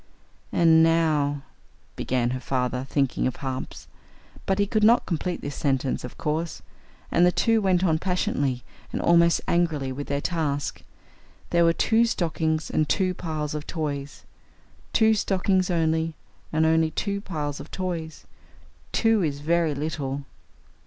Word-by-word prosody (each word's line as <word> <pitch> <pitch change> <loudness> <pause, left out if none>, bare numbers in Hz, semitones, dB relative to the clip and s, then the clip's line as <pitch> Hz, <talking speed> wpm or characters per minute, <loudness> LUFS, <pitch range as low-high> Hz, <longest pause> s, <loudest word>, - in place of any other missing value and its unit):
"And 165 -1 +5
now 155 -4 +2 0.3
" - - -35
began 125 -1 0
her 130 - -3
father, 125 0 -2
thinking 135 -3 +1
of 130 - -3
harps. 130 -1 -6 0.6
But 195 - +2
he 205 - +3
could 215 +1 0
not 235 +3 +5
complete 175 +1 -2
this 145 - -5
sentence, 135 -2 -1
of 125 - -8
course, 155 +2 -3 0.5
and 170 - +4
the 180 - +5
two 225 +4 +2
went 185 -2 +2
on 160 -4 +2
passionately 140 -9 -1 0.3
and - - -3
almost 170 0 +4
angrily 160 -6 +1
with 140 +2 -5
their 140 0 -1
task. 145 -3 -2 0.7
There 170 0 +4
were 165 - +5
two 225 +7 +3
stockings 160 -6 -1
and 155 - +1
two 185 -2 +1
piles 155 -4 -4
of 150 0 -5
toys. 145 -4 -4 0.7
Two 220 -1 +4
stockings 190 -2 +1
only, 160 -1 0 0.4
and 160 0 +2
only 160 0 +3
two 200 +4 -2
piles 150 -7 -4
of 150 - -9
toys! 170 -4 -5 0.7
Two 225 -2 +3
is 145 -4 -2
very 165 -1 +1
little! 145 -2 -3
160 Hz, 150 wpm, -25 LUFS, 145-180 Hz, 0.7 s, And